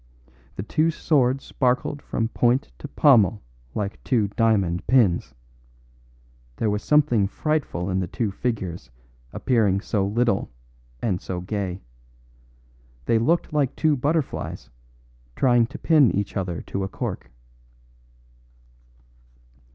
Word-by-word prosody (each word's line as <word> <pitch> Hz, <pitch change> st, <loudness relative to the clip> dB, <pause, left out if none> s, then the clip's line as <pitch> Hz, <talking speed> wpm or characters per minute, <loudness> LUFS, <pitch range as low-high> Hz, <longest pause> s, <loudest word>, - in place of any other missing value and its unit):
The 95 Hz, -, -4 dB
two 155 Hz, +9 st, +1 dB
swords 135 Hz, -5 st, +1 dB
sparkled 130 Hz, +3 st, -1 dB
from 115 Hz, -1 st, -2 dB
point 125 Hz, +3 st, +1 dB
to -, -, -7 dB
pommel 115 Hz, -8 st, +4 dB, 0.3 s
like 100 Hz, -1 st, -4 dB
two 110 Hz, -6 st, +1 dB
diamond 100 Hz, -5 st, +1 dB
pins. 90 Hz, -, +2 dB, 1.2 s
There 110 Hz, -, 0 dB
was 105 Hz, 0 st, -1 dB
something 140 Hz, -9 st, +3 dB
frightful 145 Hz, -, -2 dB
in 95 Hz, -1 st, 0 dB
the 90 Hz, -, -2 dB
two 110 Hz, +3 st, -2 dB
figures 95 Hz, -6 st, -4 dB, 0.4 s
appearing 110 Hz, -6 st, +1 dB
so 100 Hz, -1 st, -1 dB
little 115 Hz, 0 st, 0 dB, 0.5 s
and 95 Hz, -6 st, 0 dB
so 90 Hz, -1 st, -4 dB
gay. 95 Hz, 0 st, -4 dB, 1.2 s
They 115 Hz, -, +3 dB
looked 160 Hz, +7 st, +1 dB
like 140 Hz, -3 st, +1 dB
two 155 Hz, -2 st, +2 dB
butterflies 145 Hz, -, -2 dB, 0.6 s
trying 120 Hz, -3 st, +3 dB
to 145 Hz, +4 st, -9 dB
pin 150 Hz, -7 st, +4 dB
each 100 Hz, 0 st, -2 dB
other 90 Hz, -5 st, -3 dB
to 95 Hz, -, -4 dB
a -, -, -2 dB
cork. -, -, -5 dB
115 Hz, 120 wpm, -24 LUFS, 95-135 Hz, 1.2 s, pommel